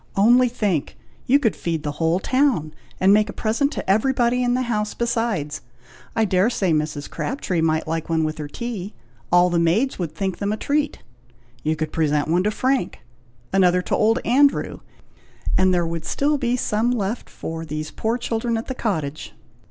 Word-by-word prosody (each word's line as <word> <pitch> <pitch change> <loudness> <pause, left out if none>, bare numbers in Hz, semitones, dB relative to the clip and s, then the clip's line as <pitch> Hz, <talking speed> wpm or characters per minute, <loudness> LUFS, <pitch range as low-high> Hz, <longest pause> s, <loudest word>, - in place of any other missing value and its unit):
Only 240 +5 +5
think! 200 - -1 0.3
you 270 - +6
could 235 -8 +1
feed 165 -3 -3
the 150 - -2
whole 165 +2 +2
town, 250 - +1 0.3
and 190 +2 +5
make 210 0 +3
a - - -5
present 240 +6 0
to - - -5
everybody 240 +4 +2
in 245 0 +2
the 255 - 0
house 210 -3 -2
besides! 225 -11 -1 0.5
I 225 - +3
dare 190 +2 +2
say 190 -8 0
Mrs. 150 -1 -2
Crabtree 195 - -2
might 160 -1 +1
like 165 0 -3
one 160 -1 +1
with 155 0 -3
her 150 - -4
tea. 210 +2 -6 0.4
All 175 0 +5
the 170 - +2
maids 195 +12 +1
would 165 -3 -4
think 190 0 -2
them 200 0 -1
a 215 - -1
treat. 295 +5 -1 0.6
You 155 +1 0
could 155 0 -3
present 150 -2 +1
one 170 +3 +2
to - - +3
Frank, 260 +5 0 0.6
another 180 -1 +4
to - - 0
old 225 +2 +3
Andrew, 275 +4 +3 0.8
and 185 0 +4
there 175 -1 +2
would 165 -1 -4
still 290 +1 +1
be 245 -2 +1
some 225 -1 0
left 230 -2 -2
for 165 0 -6
these 155 -1 -5
poor 225 +2 -1
children 230 -1 -1
at 225 - -4
the 260 - -4
cottage." 155 - -3
200 Hz, 185 wpm, -22 LUFS, 165-240 Hz, 0.8 s, you